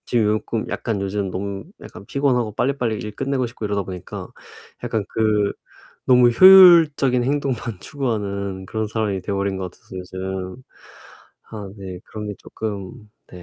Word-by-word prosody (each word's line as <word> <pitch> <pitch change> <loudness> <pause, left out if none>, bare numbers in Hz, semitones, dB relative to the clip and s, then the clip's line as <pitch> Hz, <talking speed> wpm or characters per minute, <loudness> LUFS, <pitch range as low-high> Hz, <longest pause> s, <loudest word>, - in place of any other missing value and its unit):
지금 110 -3 +2
꼭 115 -2 -3
약간 105 -4 -2
요즘 100 0 -2
너무 100 +1 -4 0.2
약간 100 - -11
피곤하고 125 -5 0
빨리빨리 125 -4 0
일 105 0 -7
끝내고 135 -1 -1
싶고 115 -2 -7
이러다 100 -1 -1
보니까 90 -2 -7 0.6
약간 110 -3 -1
그 105 -2 +1 0.5
너무 125 -1 +6
효율적인 165 -7 +7
행동만 130 -6 -2
추구하는 100 -8 -3
그런 110 +2 -2
사람이 105 -3 -2
돼 100 - -4
버린 100 0 -1
것 95 -1 -4
같아서 95 - -14
요즘 95 +3 -6 0.9
아 105 -3 -7
네 95 -2 -7
그런 105 -1 -7
게 105 - -4
쪼끔 105 +1 -7 0.2
네 90 - -11
105 Hz, 310 characters per minute, -21 LUFS, 100-125 Hz, 0.9 s, 효율적인